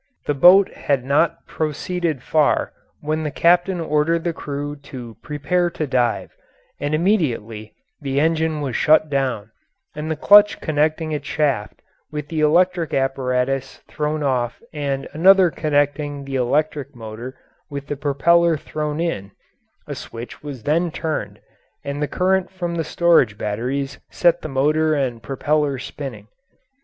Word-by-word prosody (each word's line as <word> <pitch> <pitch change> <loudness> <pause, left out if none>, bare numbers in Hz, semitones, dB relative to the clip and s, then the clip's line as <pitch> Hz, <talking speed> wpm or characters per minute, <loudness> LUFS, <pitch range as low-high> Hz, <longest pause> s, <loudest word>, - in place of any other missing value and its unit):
The 145 - +1
boat 180 +7 +6
had 135 -3 -1
not 150 +4 +1
proceeded 160 -1 -2
far 155 -2 +1 0.3
when 155 +1 -1
the 155 - -2
captain 175 +4 +2
ordered 165 +1 +1
the 170 - -1
crew 145 -1 -5
to 130 -5 -10
prepare 175 +4 0
to 160 -2 -3
dive, 125 -4 0 0.5
and 145 +1 -1
immediately 120 - -1 0.3
the 140 -1 -1
engine 160 0 +1
was 135 -5 -3
shut 155 0 +4
down 125 -6 -1 0.4
and 150 +1 -4
the 160 - 0
clutch 205 +6 +6
connecting 155 +1 0
its 150 -1 -4
shaft 105 - -1 0.3
with 150 -1 -5
the 160 - -2
electric 170 +2 +2
apparatus 135 0 -1
thrown 150 0 -2
off 125 -3 -1
and 140 -2 -3
another 185 +2 +6
connecting 145 -1 -1
the 135 0 -5
electric 140 +2 0
motor 115 +3 -8 0.3
with 140 -1 -6
the 145 - -4
propeller 160 +4 +3
thrown 150 +1 -4
in; 165 - -2 0.6
a - - -5
switch 115 +1 -9
was 140 -6 -8
then 170 +4 +1
turned 130 -12 -4 0.4
and 140 +1 -4
the 150 - 0
current 190 +2 +1
from 175 -2 -4
the 165 -1 -1
storage 155 -10 +3
batteries 125 +7 -3
set 175 -1 +2
the 155 - -6
motor 155 +3 +2
and 125 -5 -2
propeller 145 +1 0
spinning. 120 -5 -7
150 Hz, 145 wpm, -21 LUFS, 135-160 Hz, 0.6 s, boat